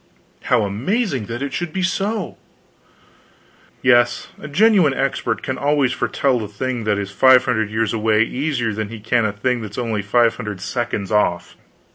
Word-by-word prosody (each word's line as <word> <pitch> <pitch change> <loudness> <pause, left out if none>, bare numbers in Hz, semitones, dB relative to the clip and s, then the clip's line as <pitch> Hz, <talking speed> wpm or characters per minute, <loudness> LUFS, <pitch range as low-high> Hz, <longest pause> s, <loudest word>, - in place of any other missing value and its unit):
"How - - +3
amazing 130 - -1
that 120 +3 -4
it 140 - -4
should 175 -2 -3
be 190 +2 -2
so!" 200 +2 -2 1.5
"Yes, 120 -1 +3
a - - -7
genuine 180 -3 +4
expert 130 -4 -1
can 130 - -3
always 140 -3 +1
foretell 130 -5 0
a - - -5
thing 120 +2 -4
that 105 -1 +1
is 100 -1 -4
five 130 +5 +5
hundred 110 -5 0
years 110 0 -1
away 110 0 +2
easier 125 -3 -2
than 105 0 -4
he 115 0 -8
can 115 +2 +1
a 105 - 0
thing 120 +4 -1
that's 105 -1 -8
only 115 -4 -1
five 115 +3 +2
hundred 105 -3 -5
seconds 110 0 -3
off." 105 -5 0
120 Hz, 170 wpm, -20 LUFS, 105-135 Hz, 1.5 s, five